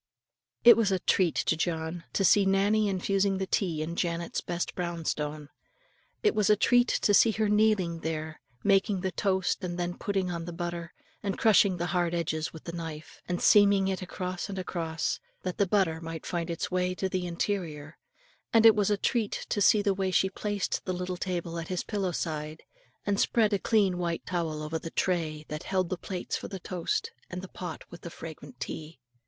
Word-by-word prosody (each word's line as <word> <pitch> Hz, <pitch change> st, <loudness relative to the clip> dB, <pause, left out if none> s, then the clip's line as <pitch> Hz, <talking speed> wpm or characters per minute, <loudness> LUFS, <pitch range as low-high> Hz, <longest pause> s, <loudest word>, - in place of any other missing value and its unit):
It 235 Hz, -, +10 dB
was 215 Hz, -4 st, +2 dB
a 190 Hz, -, +3 dB
treat 180 Hz, -1 st, +2 dB
to -, -, +1 dB
John 165 Hz, 0 st, -2 dB
to 195 Hz, -, +2 dB
see 205 Hz, +2 st, +6 dB
Nannie 200 Hz, +2 st, +3 dB
infusing 195 Hz, +1 st, +1 dB
the 190 Hz, -, -1 dB
tea 170 Hz, -5 st, 0 dB
in 170 Hz, +2 st, -4 dB
Janet's 170 Hz, -1 st, -2 dB
best 175 Hz, 0 st, -3 dB
brown 170 Hz, -2 st, -4 dB
stone, 150 Hz, -1 st, -3 dB, 0.7 s
it 425 Hz, -, +4 dB
was 210 Hz, -1 st, +2 dB
a 210 Hz, -, +7 dB
treat 245 Hz, +3 st, +4 dB
to 205 Hz, -, +2 dB
see 225 Hz, -, +6 dB
her 215 Hz, 0 st, +1 dB
kneeling 210 Hz, -5 st, +2 dB
there, 160 Hz, -1 st, -4 dB, 0.2 s
making 195 Hz, -1 st, +3 dB
the 190 Hz, 0 st, -1 dB
toast 190 Hz, -1 st, 0 dB
and 175 Hz, -1 st, -3 dB
then 175 Hz, 0 st, -2 dB
putting 195 Hz, -3 st, -1 dB
on 170 Hz, -1 st, -4 dB
the 175 Hz, -, -6 dB
butter, 170 Hz, -1 st, -4 dB, 0.3 s
and 200 Hz, -3 st, -2 dB
crushing 200 Hz, -4 st, +4 dB
the 175 Hz, -, -1 dB
hard 175 Hz, -1 st, +1 dB
edges 160 Hz, -2 st, -1 dB
with 160 Hz, -, -11 dB
the 170 Hz, -, -5 dB
knife, 160 Hz, -2 st, -7 dB
and 175 Hz, -1 st, -2 dB
seaming 200 Hz, -2 st, +6 dB
it 190 Hz, 0 st, -2 dB
across 185 Hz, +1 st, -4 dB
and 195 Hz, -, -5 dB
across, 165 Hz, -3 st, -2 dB, 0.2 s
that 185 Hz, -1 st, -4 dB
the 200 Hz, -, +3 dB
butter 180 Hz, -5 st, +1 dB
might 165 Hz, -1 st, -6 dB
find 170 Hz, -1 st, -2 dB
its 170 Hz, +2 st, -3 dB
way 180 Hz, 0 st, 0 dB
to 190 Hz, -, -1 dB
the 185 Hz, -1 st, -2 dB
interior; 170 Hz, -4 st, -3 dB, 0.6 s
and 225 Hz, -1 st, +5 dB
it 225 Hz, -, +10 dB
was 205 Hz, -2 st, +2 dB
a 205 Hz, -, +2 dB
treat 220 Hz, +1 st, -1 dB
to 205 Hz, -, 0 dB
see 205 Hz, +1 st, +5 dB
the 200 Hz, -2 st, +2 dB
way 190 Hz, 0 st, -1 dB
she 190 Hz, +1 st, +2 dB
placed 205 Hz, 0 st, -2 dB
the 185 Hz, -, -1 dB
little 180 Hz, 0 st, -3 dB
table 175 Hz, -2 st, -3 dB
at 160 Hz, -, -6 dB
his 180 Hz, -1 st, -2 dB
pillow 195 Hz, -4 st, -2 dB
side, 155 Hz, -1 st, -4 dB, 0.4 s
and 200 Hz, -1 st, +1 dB
spread 220 Hz, -3 st, +3 dB
a 200 Hz, -, +2 dB
clean 195 Hz, -5 st, +2 dB
white 170 Hz, -1 st, -2 dB
towel 165 Hz, -4 st, -2 dB
over 155 Hz, +1 st, -3 dB
the 165 Hz, -, -6 dB
tray, 160 Hz, -4 st, -1 dB
that 150 Hz, +1 st, -5 dB
held 185 Hz, -2 st, -1 dB
the -, -, -1 dB
plates 180 Hz, 0 st, -4 dB
for -, -, -5 dB
the 195 Hz, -, -6 dB
toast, 305 Hz, -, -2 dB, 0.2 s
and 180 Hz, +1 st, -6 dB
the -, -, -6 dB
pot 180 Hz, 0 st, -7 dB
with 175 Hz, -, -10 dB
the 170 Hz, -, -7 dB
fragrant 145 Hz, -6 st, -10 dB
tea. 155 Hz, -2 st, -6 dB
180 Hz, 205 wpm, -29 LUFS, 165-195 Hz, 0.7 s, It